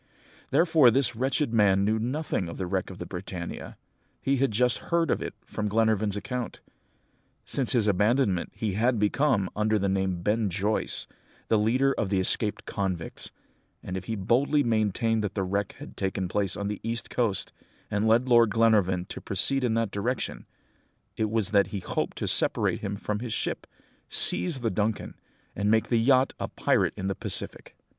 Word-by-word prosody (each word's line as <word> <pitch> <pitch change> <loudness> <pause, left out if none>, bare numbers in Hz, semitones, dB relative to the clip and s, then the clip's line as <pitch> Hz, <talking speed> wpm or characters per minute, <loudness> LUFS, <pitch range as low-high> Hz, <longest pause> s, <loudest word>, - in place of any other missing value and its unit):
"Therefore 160 -3 +5
this 130 0 +2
wretched 130 +1 0
man 100 -3 +4
knew 110 +1 +1
nothing 125 - -2
of 85 - -8
the 95 - -3
wreck 95 0 -2
of 95 - -9
the - - -6
Britannia; 90 -1 -7 0.4
he 135 0 0
had 135 +1 +2
just 120 +3 +1
heard 170 -3 +2
of - - 0
it - - -5
from 105 -1 -3
Glenarvan's 110 -1 +1
account. 125 +3 -5 0.9
Since 135 -3 0
his 115 -4 +2
abandonment, 105 -1 +1
he 105 -4 -2
had 120 +4 +1
become, 105 0 +1
under 110 +1 +1
the 100 -1 0
name 95 -1 0
of 85 -1 -7
Ben 105 +1 +1
Joyce, 100 +4 -1 0.4
the 110 - +3
leader 130 +6 +2
of 105 - -2
the 95 -1 +1
escaped 105 +3 +3
convicts; 95 -5 -4 0.5
and 90 - -5
if 95 -1 -5
he 115 - -3
boldly 130 +9 +2
maintained 110 0 +1
that 105 - -3
the 95 - 0
wreck 100 +2 -2
had - - -11
taken 95 -1 -2
place 95 +1 -1
on 100 - -3
the 105 -1 -4
east 115 +1 -4
coast, 115 -6 -1 0.4
and 105 +2 +1
led 115 +3 +3
Lord 120 -2 +5
Glenarvan 100 -5 +2
to - - -7
proceed 130 +8 0
in 115 -3 +1
that 115 -3 0
direction, 105 - -3 0.7
it 110 -1 -1
was 110 -2 -1
that 100 -2 +4
he 100 - -5
hoped - - -3
to - - -2
separate - - +2
him 100 -1 -4
from 105 0 -3
his 120 -1 -4
ship, - - -3 0.4
seize 160 -8 +3
the 115 - 0
Duncan, 105 +2 -2 0.4
and 100 +1 0
make 110 0 +2
the 120 - +3
yacht 130 +2 +3
a - - -2
pirate - - +1
in 95 - -4
the 100 - 0
Pacific." - - -5
110 Hz, 185 wpm, -27 LUFS, 100-120 Hz, 0.9 s, Therefore